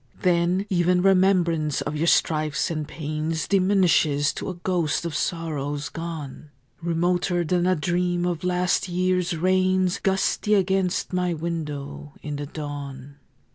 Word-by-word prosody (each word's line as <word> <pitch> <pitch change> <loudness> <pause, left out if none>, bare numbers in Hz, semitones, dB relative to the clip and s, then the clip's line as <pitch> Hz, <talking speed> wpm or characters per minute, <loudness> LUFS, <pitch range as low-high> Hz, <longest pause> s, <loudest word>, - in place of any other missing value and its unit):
Then 180 +1 +2
even 180 0 +2
remembrance 180 -6 +3
of 150 - -3
your 160 +3 0
strifes 155 +1 +2
and 155 -2 -3
pains 155 +1 -3
Diminishes 180 -7 +3
to - - -5
a 185 - -5
ghost 170 -4 -1
of 170 - -3
sorrows 145 -3 -2
gone, 155 -3 -7 0.3
Remoter 175 +1 0
than 175 +2 +1
a 185 - +3
dream 175 +2 0
of 175 -2 -2
last 180 +1 +1
year's 180 -1 0
rains 185 +2 +2
Gusty 195 +2 +1
against 190 -1 0
my 180 -1 0
window 150 -3 -5
in 150 -1 -4
the 145 0 -5
dawn. 145 -2 -7
170 Hz, 135 wpm, -24 LUFS, 150-180 Hz, 0.3 s, remembrance